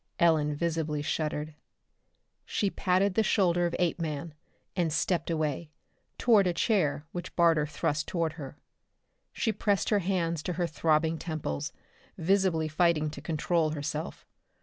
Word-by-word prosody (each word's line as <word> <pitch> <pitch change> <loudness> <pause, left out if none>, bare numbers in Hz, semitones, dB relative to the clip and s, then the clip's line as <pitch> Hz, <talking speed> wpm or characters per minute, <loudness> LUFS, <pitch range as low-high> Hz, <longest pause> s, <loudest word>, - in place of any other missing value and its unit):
Ellen 155 -3 +3
visibly 155 -2 -1
shuddered. 150 0 -2 0.9
She 200 -2 -1
patted 185 +1 +2
the 220 - +3
shoulder 175 -4 +2
of 170 - -3
Apeman 165 -3 -2 0.4
and 175 -4 +1
stepped 175 +3 0
away, 155 -1 -1 0.5
toward 215 -6 +4
a 175 - +1
chair 160 -10 +1
which 175 0 -6
Barter 165 -3 +4
thrust 150 0 -1
toward 165 -3 -1
her. 145 -3 -9 0.7
She 230 - 0
pressed 205 -2 0
her 210 - +3
hands 170 -4 -1
to 180 - -3
her 175 +1 0
throbbing 160 0 +1
temples, 155 - -3 0.5
visibly 180 -2 +2
fighting 155 -1 +2
to - - -9
control 165 0 0
herself. 155 +2 -4
165 Hz, 135 wpm, -29 LUFS, 155-180 Hz, 0.9 s, toward